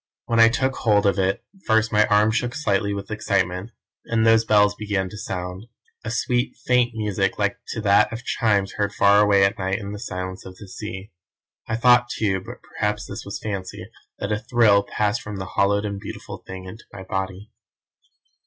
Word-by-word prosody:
When 115 -1 +1
I 115 0 +8
took 130 +2 -1
hold 105 -2 +2
of 100 0 +2
it 95 +1 0 0.2
first 110 0 +3
my 105 0 +4
arm 105 0 +4
shook 120 +2 -1
slightly 100 -8 0
with 100 +1 -5
excitement, 95 -2 -1 0.4
and 115 -1 +1
those 115 0 +5
bells 105 -1 +4
began 100 -3 -2
to 105 - -11
sound; 90 +2 -5 0.4
a - - -4
sweet, 120 +2 -1
faint 120 -2 +2
music 100 -3 -1
like 100 -1 -1
to 110 - -4
that 105 0 +4
of 115 +1 -6
chimes 100 -4 +1
heard 100 -1 -1
far 100 +1 +5
away 100 -1 +4
at 100 +3 -1
night 95 +1 -1
in 100 -2 -6
the 105 - -6
silence 95 -3 -5
of 95 - -11
the 105 - -11
sea. 100 0 -8 0.6
I 110 - -1
thought 120 +1 +4
too, 95 -5 -1
but - - -11
perhaps 105 0 -3
this 100 - -7
was 100 - -6
fancy, 95 -3 -5 0.3
that 100 - -4
a 105 - 0
thrill 110 -3 +4
passed 105 +2 -1
from 105 -1 -7
the 95 -1 -6
hallowed 100 +1 +2
and 100 -1 -4
beautiful 100 - -8
thing 95 0 -8
into 110 +5 -11
my 95 - -9
body. 95 +3 -4
105 Hz, 195 wpm, -23 LUFS, 100-110 Hz, 0.6 s, I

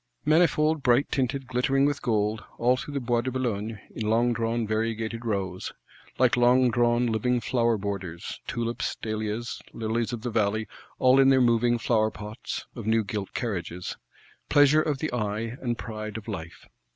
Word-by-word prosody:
Manifold, 155 -1 +3
bright 125 +2 +3
tinted, 135 0 -1
glittering 135 +2 +2
with 145 0 0
gold; 110 -2 0
all 125 +2 +3
through 145 +3 -6
the - - +1
Bois 120 -2 +1
de 130 - -2
Boulogne, 115 -4 -2
in 110 -1 -3
longdrawn 115 0 +1
variegated 115 +1 -2
rows;—like 100 +4 -2
longdrawn 120 -1 +4
living 120 +2 +1
flower 120 -2 +1
borders, 95 -4 -5
tulips, 115 0 -2
dahlias, 110 +1 -4
lilies 115 +1 -1
of 115 -2 -5
the 120 - -2
valley; 110 0 0 0.3
all 130 +1 +5
in 135 0 +6
their 135 -1 +5
moving 120 -1 +3
flower 110 -2 +2
pots 105 0 -6
(of - - -7
new 110 0 +3
gilt 100 -1 -5
carriages): 90 -6 -3 0.5
pleasure 145 +1 +6
of 150 -3 -1
the 155 -1 -3
eye, 110 0 -2
and 120 -2 -1
pride 110 -2 -6
of 110 - -9
life! 85 -6 -7
115 Hz, 155 wpm, -27 LUFS, 110-125 Hz, 0.5 s, in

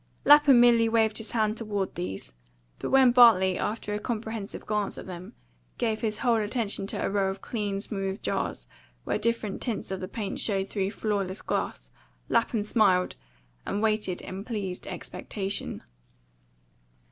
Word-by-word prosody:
Lapham 290 -3 +8
merely 235 -1 +5
waved 220 -1 +2
his 225 - -6
hand 215 -2 +1
toward 205 -4 -2
these; 95 -5 -5 0.5
but - - -3
when 265 -2 +6
Bartley, 220 -7 +6
after 210 -1 -2
a 210 - -1
comprehensive 220 -3 -5
glance 210 -1 -1
at - - -7
them, 180 -1 -8 0.4
gave 220 -2 -1
his 215 -2 -1
whole 240 -3 +2
attention 210 -2 -1
to - - -2
a - - +1
row 195 -1 +1
of 195 0 -6
clean, 205 -4 -2
smooth 195 -2 -3
jars, - - -2 0.4
where - - -1
different 230 -3 -1
tints 230 -5 -3
of 190 - -3
the 185 - -5
paint 205 0 -4
showed 195 -3 0
through 195 -1 -1
flawless 200 -3 -2
glass, - - -3 0.4
Lapham 230 -2 +1
smiled, 200 -4 +3 0.5
and 205 - -2
waited 215 -4 0
in 190 +1 -7
pleased 205 -6 -4
expectation. 200 -1 -4
210 Hz, 155 wpm, -27 LUFS, 195-225 Hz, 0.5 s, Lapham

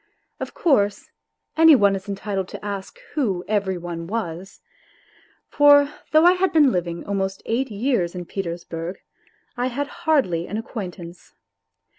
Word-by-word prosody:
Of - - -6
course, 205 - +1 0.4
any 320 -1 +8
one 200 -5 +4
is 195 +1 -7
entitled 195 -1 -3
to - - -9
ask 200 - -5 0.2
who 200 - -1
" - - -25
every 200 -3 0
oiifi^_jras. 175 +1 -5 0.9
For 290 0 +5 0.2
though 310 +2 +5
I 355 - +8
had 370 +1 +1
been 300 -6 +5
living 170 -3 -3
almost 195 -1 -2
eight 255 +4 -1
years 205 -5 -1
in 180 -1 -5
Petersburg 170 -1 -5 0.6
I 250 0 -1
had 270 +3 -2 0.2
hardly 260 - +1
an 210 - -4
acquaintance 185 -6 -8
200 Hz, 140 wpm, -22 LUFS, 180-270 Hz, 0.9 s, any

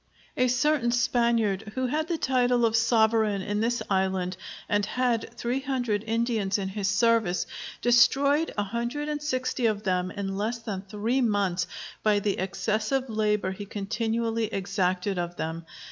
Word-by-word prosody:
A 255 - +3
certain 250 +1 +2
Spaniard, 230 -4 +1
who 260 0 0
had 310 +5 -1
the 340 -1 -1
title 245 -3 +2
of 225 -1 +1
Sovereign 220 -3 +3
in 205 +1 -1
this 235 0 0
island 190 -1 0 0.3
and 205 -1 +1
had 240 +1 0
three 245 +3 -1
hundred 245 -6 -1
Indians 225 -3 0
in 195 -1 -3
his 195 0 -2
service, 200 -2 +2 0.4
destroyed 280 +6 +4
a 205 - +2
hundred 235 +8 -3
and 295 -1 -2
sixty 255 -4 0
of 210 -1 -1
them 185 -1 0
in 195 0 -4
less 220 +4 -1
than 215 -5 -5
three 215 +6 -1
months 200 -6 +1 0.3
by 210 -1 +3
the 205 -1 -1
excessive 215 +7 -1
labor 210 -3 +1
he 200 +1 -7
continually 225 +3 -1
exacted 190 -2 -1
of 175 0 -3
them. 165 0 -5
220 Hz, 155 wpm, -27 LUFS, 195-240 Hz, 0.4 s, destroyed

